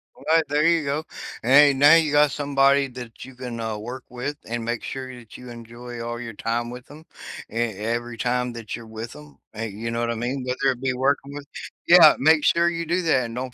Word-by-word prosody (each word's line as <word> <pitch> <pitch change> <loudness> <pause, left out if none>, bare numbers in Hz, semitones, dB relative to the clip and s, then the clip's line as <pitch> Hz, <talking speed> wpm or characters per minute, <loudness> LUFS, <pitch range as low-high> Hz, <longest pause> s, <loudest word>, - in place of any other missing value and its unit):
Alright, 160 0 +1
there 150 +1 +2
you 165 -1 +3
go. 145 +2 -2 0.4
And 120 - -1
hey, 145 0 +7
now 145 +3 +6
you 160 -3 +3
got 150 0 +4
somebody 140 -1 +2
that 120 -2 -10
you 130 -1 -12
can, 125 -2 -7
uh, 110 -2 -3
work 120 +4 -7
with, 125 +4 -5
and 115 0 -4
make 120 0 -3
sure 130 -1 -6
that 120 -3 -13
you 125 0 -11
enjoy 120 +1 -9
all 120 0 -5
your 115 -2 -7
time 115 +3 -3
with 125 +1 -11
'em, 155 +2 -13 0.5
e - - -12
every 115 +1 -2
time 125 +1 -1
that 115 -2 -6
you're 115 -1 -11
with 110 -1 -8
'em, 75 -2 -14 0.2
hey, 115 +1 -4
you 110 +3 -5
know 115 - -2
what 120 0 -1
I 115 - -1
mean? 125 +4 -3
Whether 130 +2 0
it 125 -1 -7
be 130 -1 0
working 140 +2 -1
with 145 - -8 0.4
yeah, 170 -3 +8
make 155 +1 +4
sure 170 0 +3
you 170 -1 -4
do 175 +3 0
that, 135 -6 +2
and 115 0 -7
don't 125 0 -5
125 Hz, 235 wpm, -23 LUFS, 115-140 Hz, 0.5 s, yeah